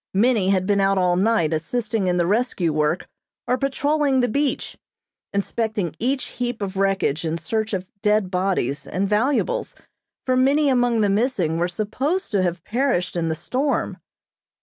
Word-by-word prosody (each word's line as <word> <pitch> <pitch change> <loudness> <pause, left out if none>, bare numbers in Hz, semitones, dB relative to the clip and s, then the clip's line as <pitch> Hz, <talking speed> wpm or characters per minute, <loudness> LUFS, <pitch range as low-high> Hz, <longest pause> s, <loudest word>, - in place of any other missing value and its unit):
Many 215 -2 +3
had 190 -2 +2
been 200 0 +2
out 195 0 +2
all 180 -1 +3
night 190 -4 +2
assisting 215 +5 -1
in 180 0 +1
the 175 - +2
rescue 195 -5 +1
work 150 +3 0 0.4
or 250 - +2
patrolling 275 +1 +1
the 245 - +3
beach, 280 +5 -1 0.6
inspecting 200 -3 -2
each 260 +4 0 0.2
heap 245 -1 -2
of 200 -2 -4
wreckage 195 -6 +1
in 165 0 -1
search 220 +7 -2
of 190 -3 -2 0.2
dead 210 -3 +2
bodies 180 -7 -1
and 190 +4 -1
valuables, 270 - 0 0.5
for 255 - +2
many 280 +3 +3
among 245 -3 +2
the 205 - +3
missing 200 - +1
were 175 - +1
supposed 255 - -2
to 200 -3 +2
have 175 -2 -1
perished 240 -8 0
in 165 -1 0
the 160 - -1
storm. 260 - -1
205 Hz, 165 wpm, -22 LUFS, 180-250 Hz, 0.6 s, Many